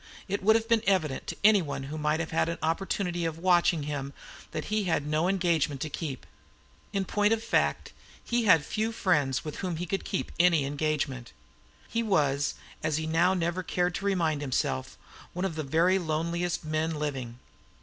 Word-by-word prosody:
It 200 +1 -2
would 220 +3 +5
have 225 0 +1
been 230 -1 +3
evident 160 -9 +1
to - - -3
anyone 185 -10 +3
who 140 +3 -6
might 150 +1 +1
have 165 - -3
had 160 0 +1
an 170 - -3
opportunity 175 +1 -1
of 165 -1 -2
watching 175 -2 +3
him 140 -1 -4 0.4
that 155 - -4
he 215 -2 +1
had 160 -5 0
no 155 +3 +1
engagement 170 -7 +1
to 155 - -3
keep. 140 -5 -5 0.7
In 195 -1 -1
point 205 +3 +2
of 225 0 -2
fact, 230 - 0 0.3
he 240 -1 0
had 165 -7 +5
few 220 +1 -1
friends 150 - +1
with 150 - -5
whom 180 -3 -3
he 175 +3 -3
could 195 +3 -2
have - - -10
kept 190 - -2
any 170 -5 +4
engagement. 140 -3 -2 0.5
He 230 - -1
was, 145 -10 +1 0.3
as 155 -1 0
he 160 - -2
now 170 +4 +3
never 175 +1 -1
cared 180 0 0
to 195 - -4
remind 165 -7 +1
himself, 120 - -2 0.4
one 180 +2 -2
of 190 - -2
the 155 - -3
very 165 +6 +3
loneliest 170 +1 -2
men 155 +1 -1
living. 135 -6 -4
165 Hz, 190 wpm, -28 LUFS, 150-190 Hz, 0.7 s, would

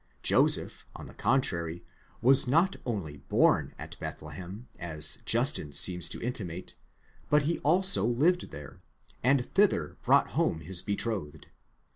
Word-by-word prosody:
Joseph, - - +2
on - - -10
the - - -12
contrary, 85 -10 0 0.4
was 130 +1 +4
not 165 +9 +2
only 90 -11 -4
born 70 - +1
at - - -10
Bethlehem, 95 +7 -9
as 80 +3 +2
Justin 120 - +2
seems 90 +4 +1
to - - -4
intimate, 95 -8 -5 0.6
but 150 -1 +3 0.2
also 185 +6 +4
lived 150 +11 +1
there, 75 0 -11 0.4
and 130 0 +2
thither 195 - 0
brought - - +3
home 80 - -1
his 90 +2 -1
betrothed. 100 -7 -4
105 Hz, 125 wpm, -28 LUFS, 85-135 Hz, 0.6 s, was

